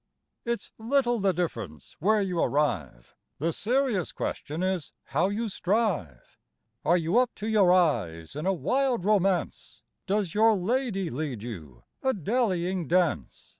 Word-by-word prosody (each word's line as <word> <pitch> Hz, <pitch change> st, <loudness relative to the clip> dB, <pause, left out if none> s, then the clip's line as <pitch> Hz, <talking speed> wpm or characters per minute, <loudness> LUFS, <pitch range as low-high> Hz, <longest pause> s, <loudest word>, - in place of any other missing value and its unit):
It's 235 Hz, 0 st, -3 dB
little 240 Hz, 0 st, +1 dB
the 195 Hz, -1 st, +3 dB
difference 115 Hz, -, -4 dB
where 210 Hz, +4 st, +3 dB
you 180 Hz, -3 st, -2 dB
arrive; 90 Hz, -, -1 dB, 0.2 s
The 165 Hz, +3 st, -1 dB
serious 240 Hz, -, 0 dB
question 155 Hz, +5 st, -4 dB
is 185 Hz, -10 st, -2 dB
how 170 Hz, +7 st, 0 dB
you 220 Hz, +3 st, -2 dB
strive. 185 Hz, -, -2 dB, 0.4 s
Are 175 Hz, +3 st, +4 dB
you 170 Hz, +7 st, +2 dB
up 250 Hz, -1 st, 0 dB
to 210 Hz, -, -6 dB
your 205 Hz, -5 st, +4 dB
eyes 115 Hz, -, +1 dB
in 155 Hz, +5 st, -3 dB
a -, -, +4 dB
wild 240 Hz, -, 0 dB
romance? 185 Hz, -, 0 dB, 0.2 s
Does 195 Hz, -3 st, 0 dB
your 220 Hz, +1 st, +5 dB
lady 195 Hz, -2 st, -1 dB
lead 130 Hz, -5 st, -4 dB
you 80 Hz, -, -8 dB, 0.2 s
a 265 Hz, -1 st, +1 dB
dallying 190 Hz, -, 0 dB
dance? 170 Hz, -, 0 dB
185 Hz, 140 wpm, -27 LUFS, 150-215 Hz, 0.4 s, your